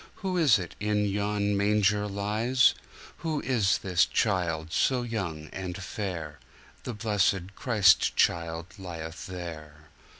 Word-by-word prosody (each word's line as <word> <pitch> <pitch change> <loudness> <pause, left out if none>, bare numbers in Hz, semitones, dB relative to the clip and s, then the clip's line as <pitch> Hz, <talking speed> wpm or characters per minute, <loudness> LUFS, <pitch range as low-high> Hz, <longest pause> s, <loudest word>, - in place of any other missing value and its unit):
Who 185 -1 0
is 155 - +5
it 90 -4 -6
in 105 0 +1
yon 100 0 0
manger 105 0 +2
lies? 105 +6 +2 0.4
Who 160 -3 -2
is 110 -7 +2
this 90 -2 +2
child 85 -6 0
so 125 -2 +2
young 95 -10 -4
and 90 -2 -5
fair? 90 -6 -5 0.5
The 120 - -4
blessed 100 -3 0
Christ 105 -7 +3
child 85 +4 0
lieth 85 -3 -7
there. 75 -4 -8
100 Hz, 125 wpm, -28 LUFS, 85-105 Hz, 0.5 s, is